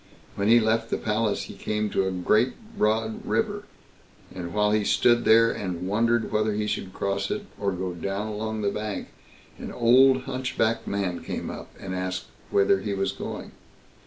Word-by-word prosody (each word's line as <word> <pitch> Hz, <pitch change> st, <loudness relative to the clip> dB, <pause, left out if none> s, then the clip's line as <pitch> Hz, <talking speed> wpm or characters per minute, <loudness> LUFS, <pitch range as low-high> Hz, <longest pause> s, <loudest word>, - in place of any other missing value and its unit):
when 100 Hz, 0 st, -1 dB
he 120 Hz, +2 st, +7 dB
left 115 Hz, 0 st, +1 dB
the -, -, 0 dB
palace 105 Hz, -1 st, 0 dB
he -, -, -8 dB
came 105 Hz, 0 st, -2 dB
to 95 Hz, -2 st, 0 dB
a -, -, -1 dB
great 105 Hz, +7 st, +2 dB, 0.2 s
broad 110 Hz, -, 0 dB
river; 205 Hz, -2 st, -1 dB, 0.7 s
and 85 Hz, -2 st, -6 dB
while 105 Hz, +1 st, +2 dB
he 105 Hz, 0 st, +2 dB
stood 120 Hz, +3 st, +3 dB
there 115 Hz, +1 st, +6 dB
and 90 Hz, -2 st, -4 dB
wondered 115 Hz, +3 st, +1 dB
whether 110 Hz, 0 st, +1 dB
he 105 Hz, +1 st, -1 dB
should 100 Hz, -2 st, -3 dB
cross 100 Hz, +1 st, -2 dB
it, 205 Hz, 0 st, -3 dB
or 100 Hz, -1 st, 0 dB
go 90 Hz, 0 st, -3 dB
down 95 Hz, +4 st, -3 dB
along 110 Hz, 0 st, -3 dB
the 100 Hz, -, +1 dB
bank, 105 Hz, -1 st, -4 dB, 0.5 s
an -, -, -6 dB
old 130 Hz, +2 st, +5 dB
hunchbacked 130 Hz, -4 st, -1 dB
man 95 Hz, -3 st, -2 dB
came -, -, -4 dB
up, -, -, -8 dB
and 95 Hz, -, -5 dB
asked 95 Hz, 0 st, -3 dB, 0.2 s
whither 100 Hz, -1 st, +3 dB
he 100 Hz, 0 st, -3 dB
was 95 Hz, 0 st, 0 dB
going? -, -, -6 dB
105 Hz, 180 wpm, -26 LUFS, 100-115 Hz, 0.7 s, he